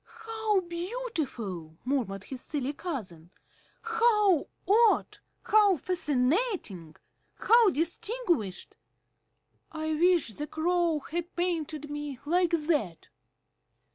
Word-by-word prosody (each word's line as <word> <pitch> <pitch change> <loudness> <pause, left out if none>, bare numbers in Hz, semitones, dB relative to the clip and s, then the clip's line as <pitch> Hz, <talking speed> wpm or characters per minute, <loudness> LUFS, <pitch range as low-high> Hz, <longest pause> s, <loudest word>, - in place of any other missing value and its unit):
"How 440 -3 +1
beautiful!" 340 - -4
murmured 235 -8 -1
his 260 +3 -8
silly 285 -1 -3
cousin. 215 - -6 0.5
"How 445 -7 +3 0.2
odd! 445 +2 +3 0.2
How 415 -3 +5
fascinating! 285 - -1 0.4
How 460 -1 +5
distinguished! 340 - -2 0.9
I 315 0 -2
wish 345 -2 +3
the 295 +5 -4
Crow 335 0 +1
had 345 +5 -5
painted 320 -4 -2
me 295 -2 -5
like 350 +3 +2
that!" 300 - -1
325 Hz, 90 wpm, -29 LUFS, 275-380 Hz, 0.9 s, How